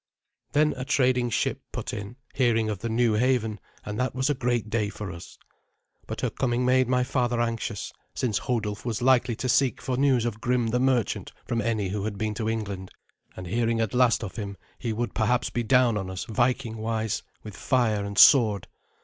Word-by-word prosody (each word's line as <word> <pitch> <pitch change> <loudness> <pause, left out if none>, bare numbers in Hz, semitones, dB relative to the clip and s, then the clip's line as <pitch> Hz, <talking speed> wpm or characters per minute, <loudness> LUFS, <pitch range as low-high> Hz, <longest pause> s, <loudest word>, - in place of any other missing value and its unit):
Then 150 +1 +3
a 130 - -3
trading 125 -2 +2
ship - - -1
put - - -5
in, 100 +3 -6 0.2
hearing 115 -4 +2
of 100 - -4
the 115 - -3
new 115 0 +2
haven, 110 -2 +1 0.3
and 105 0 -4
that 125 0 -1
was 130 +3 +1
a - - +2
great 120 -3 -1
day 105 -1 0
for 105 -2 -6
us. 85 -1 -11 0.7
But - - -5
her - - 0
coming 125 -1 0
made 130 0 +3
my 125 0 +2
father 120 -2 0
anxious, 115 -3 -2 0.2
since 115 -6 0
Hodulf 110 -4 -2
was 120 -1 -3
likely 125 -2 +3
to 130 - -3
seek 130 0 +2
for 130 -1 -2
news 130 -4 +3
of 110 -2 -3
Grim 125 -2 +1
the 125 +2 +1
merchant 130 -4 0
from 115 -1 -1
any 105 -3 -1
who 100 +1 -3
had 105 -2 -3
been 110 +1 -1
to 110 0 -2
England; 100 -4 -4 0.5
and 90 - -6
hearing 115 +4 0
at 110 -2 -1
last 125 -2 +3
of 105 +2 -7
him, 100 -3 -5 0.2
he 120 - -2
would 120 +2 -2
perhaps 120 +2 +1
be 120 - -1
down 120 -1 +3
on 95 -1 -5
us, 95 -1 -5
Vikingwise, 115 -2 -1 0.2
with 105 -2 -9
fire 115 -6 +1
and 100 0 -6
sword. 110 -8 +6
115 Hz, 200 wpm, -26 LUFS, 105-125 Hz, 0.7 s, sword